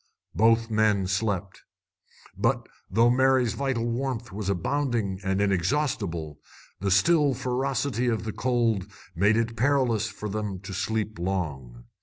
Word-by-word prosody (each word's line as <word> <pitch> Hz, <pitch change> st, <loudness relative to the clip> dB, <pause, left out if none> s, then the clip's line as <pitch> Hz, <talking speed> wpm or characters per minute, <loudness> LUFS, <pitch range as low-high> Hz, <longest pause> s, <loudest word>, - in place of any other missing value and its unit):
Both 115 Hz, +1 st, +3 dB
men 105 Hz, -3 st, +2 dB
slept. 95 Hz, -1 st, -2 dB, 0.7 s
But, -, -, 0 dB, 0.2 s
though 115 Hz, +5 st, +4 dB
Mary's 130 Hz, -2 st, +3 dB
vital 135 Hz, -4 st, -1 dB
warmth 120 Hz, 0 st, -3 dB
was 100 Hz, 0 st, -4 dB
abounding 105 Hz, -, -1 dB
and 95 Hz, 0 st, 0 dB
inexhaustible, 95 Hz, -, -1 dB, 0.4 s
the 100 Hz, -, -1 dB
still 145 Hz, -, +4 dB
ferocity 130 Hz, 0 st, -1 dB
of 110 Hz, -3 st, 0 dB
the 110 Hz, -1 st, -4 dB
cold 115 Hz, -6 st, 0 dB, 0.2 s
made 100 Hz, +6 st, +3 dB
it 115 Hz, 0 st, -1 dB
perilous 120 Hz, -4 st, +2 dB
for 105 Hz, +1 st, -6 dB
them 105 Hz, -2 st, -3 dB
to 95 Hz, 0 st, -7 dB
sleep 110 Hz, +1 st, -2 dB
long. 75 Hz, -10 st, -3 dB
110 Hz, 130 wpm, -26 LUFS, 95-125 Hz, 0.7 s, though